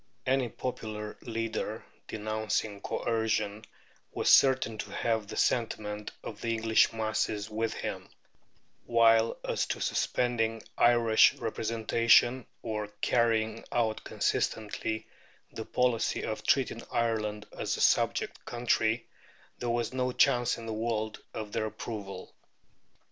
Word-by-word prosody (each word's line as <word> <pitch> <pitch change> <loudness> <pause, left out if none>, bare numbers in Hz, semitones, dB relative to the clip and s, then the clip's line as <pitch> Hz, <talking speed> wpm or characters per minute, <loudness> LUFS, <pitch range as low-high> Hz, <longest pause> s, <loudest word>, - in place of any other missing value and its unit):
Any 130 -2 +1
popular 110 -4 -5
leader 115 -1 -3 0.2
denouncing 110 -1 -2
coercion 110 -2 -1 0.5
was - - +2
certain 130 -5 +5
to - - -4
have 110 -3 -1
the - - -7
sentiment 105 -3 0
of 105 -2 -8
the 115 -1 0
English 110 0 +3
masses 110 -1 -1
with 110 +1 -1
him, - - -5 0.8
while 115 -1 +4
as - - 0
to - - -3
suspending 115 -2 0
Irish 120 -2 +5
representation 115 +2 +2 0.2
or 105 -2 -3
carrying 115 -2 +1
out 110 -2 0
consistently 110 0 -1 0.5
the 110 - -6
policy 125 -2 +1
of - - -3
treating - - +1
Ireland 105 -3 -1
as - - -2
a - - -3
subject - - +2
country, 120 -1 0 0.5
there 120 - -2
was 120 +1 -1
no 125 -1 0
chance 120 -1 +3
in 115 - -8
the 110 - -3
world 110 -1 -2
of 105 -1 -6
their 110 - -1
approval. 100 -4 -7
110 Hz, 120 wpm, -30 LUFS, 110-115 Hz, 0.8 s, certain